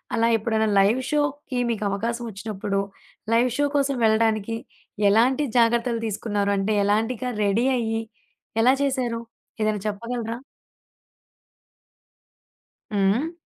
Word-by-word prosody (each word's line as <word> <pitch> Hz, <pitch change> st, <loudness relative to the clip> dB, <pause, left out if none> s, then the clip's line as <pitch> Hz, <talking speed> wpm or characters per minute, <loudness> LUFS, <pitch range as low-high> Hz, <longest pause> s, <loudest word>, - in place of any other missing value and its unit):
అలా 230 Hz, 0 st, +3 dB
ఎప్పుడైనా 220 Hz, 0 st, 0 dB
లైవ్ 210 Hz, +6 st, +3 dB
షోకి 290 Hz, -3 st, -1 dB
మీకవకాశం 225 Hz, +3 st, -2 dB
వచ్చినప్పుడు, 205 Hz, -1 st, -3 dB, 0.5 s
లైవ్ 240 Hz, +2 st, +4 dB
షో 290 Hz, 0 st, +2 dB
కోసం 275 Hz, -2 st, +1 dB
వెళ్ళడానికి 220 Hz, 0 st, +2 dB, 0.5 s
ఎలాంటి 245 Hz, +7 st, +3 dB
జాగ్రత్తలు 235 Hz, 0 st, +2 dB
తీసుకున్నారు? 205 Hz, -1 st, -1 dB
అంటే 195 Hz, +2 st, 0 dB
ఎలాంటి 220 Hz, +4 st, +1 dB
గ 250 Hz, -1 st, -2 dB
రెడీ 205 Hz, +4 st, +2 dB
అయ్యి, 225 Hz, -1 st, -1 dB, 0.6 s
ఎలా 255 Hz, +3 st, +5 dB
చేసారు? 255 Hz, -4 st, -1 dB, 0.4 s
ఏదైనా 215 Hz, -1 st, 0 dB
చెప్పగలరా? 230 Hz, +2 st, -4 dB, 2.6 s
హ్మ్. 205 Hz, +10 st, +1 dB
225 Hz, 105 wpm, -24 LUFS, 210-245 Hz, 2.6 s, ఎలా